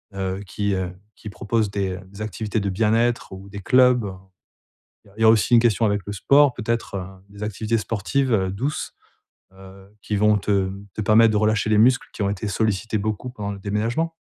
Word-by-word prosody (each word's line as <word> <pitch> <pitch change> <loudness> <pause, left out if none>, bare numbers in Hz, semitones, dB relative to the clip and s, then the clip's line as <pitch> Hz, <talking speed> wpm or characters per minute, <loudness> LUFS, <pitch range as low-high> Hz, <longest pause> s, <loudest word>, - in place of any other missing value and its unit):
heu, 95 0 -3
qui, 100 +1 -2
heu, 90 -1 -3 0.2
qui 105 - -9
proposent 105 +3 -1
des 95 -2 -2
des 100 +2 -12
activités 110 +1 -3
de 100 - -1
bien-être 115 +4 +1
ou 95 +1 -10
des 100 0 -8
clubs. 125 -1 +4 1.0
Il - - -19
y - - -21
a - - -23
il - - -6
y - - +3
a 110 - +8
aussi 115 +2 +3
une - - +7
question 115 -1 +2
avec 105 -1 +1
le 105 - -4
sport, 140 +6 +4
peut-être, 115 -2 -3
heu, 90 -2 -4 0.2
des 100 +1 -9
activités 110 +2 -1
sportives, 115 +5 -1
heu, 95 -3 +1
douces, 135 +10 -3 0.6
heu, 95 0 -15
qui 105 - -3
vont 105 0 +4
te 95 -1 0 0.2
te - - -3
permettre 110 +2 +5
de 105 - +2
relâcher 110 0 +1
les 105 - +3
muscles 125 +3 +4
qui 105 - -3
ont 100 - +1
été 100 +1 -3
sollicités 110 0 -1
beaucoup 110 +4 -3
pendant 105 -4 -5
le 100 - -9
déménagement. 115 +11 -1
105 Hz, 210 wpm, -22 LUFS, 100-115 Hz, 1.0 s, a